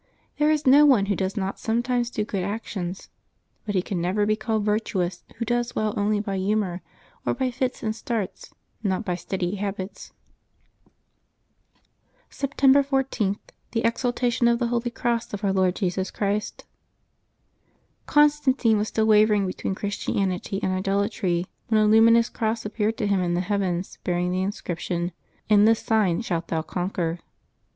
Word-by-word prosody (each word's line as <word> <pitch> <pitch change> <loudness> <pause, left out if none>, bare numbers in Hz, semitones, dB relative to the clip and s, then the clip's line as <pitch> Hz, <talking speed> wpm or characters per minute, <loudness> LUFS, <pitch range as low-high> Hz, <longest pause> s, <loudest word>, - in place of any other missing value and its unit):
There 300 0 +4
is 305 -1 +1
no 275 +3 +7
one 260 -9 +5
who 200 0 0
does 190 +3 -2
not 195 -1 -2
sometimes 240 +1 0
do 210 -3 -2
good 195 -3 -3
actions; 195 -2 -5 0.6
but 205 - -2
he 185 - +2
can 185 -3 -3
never 190 +4 +1
be 215 +1 +2
called 220 -1 -1
virtuous 210 -4 -1
who 230 - -3
does 240 +1 -1
well 215 -1 0
only 205 +1 +1
by 200 -2 -3
humor, 190 -2 0 0.4
or - - 0
by 260 -2 -1
fits 255 +1 -2
and 220 -1 -1
starts, 225 -5 -4 0.3
not 200 0 -1
by 180 - -1
steady 180 +2 -3
habits. 195 0 -5 2.2
September 275 0 +3
14.— 265 -7 0 0.4
THE 230 -1 0
EXALTATION 240 0 +1
OF 235 0 +3
THE 240 0 0
HOLY 240 0 0
CROSS 235 -2 -2
OF 205 - -9
OUR 195 -1 +2
LORD 185 -1 +2
JESUS 185 -1 -1
CHRIST. 205 +1 -2 1.4
GONSTANTINE 290 -6 +3
was 210 - -1
still 220 0 0
wavcriug 210 -2 +4
between 190 +1 -3
Christianity 195 -1 -2
and 190 - +1
idolatry 195 -2 0 0.2
when 220 -2 +3
a 215 - +4
luminous 230 +2 +6
cross 220 0 -2
appeared 215 +1 -1
to 210 - -1
him 200 -1 +2
in 175 -1 0
the 175 - +1
heavens, 190 -2 -2
bearing 180 0 0
the 185 +1 0
inscription, 175 -2 -3
^^ - - -22 0.4
In 210 -1 +5
this 225 0 +4
sign 210 -5 +1
shalt 170 -7 -2
thou 160 -1 -1
conquer.' 175 -1 -2
210 Hz, 160 wpm, -25 LUFS, 190-230 Hz, 2.2 s, no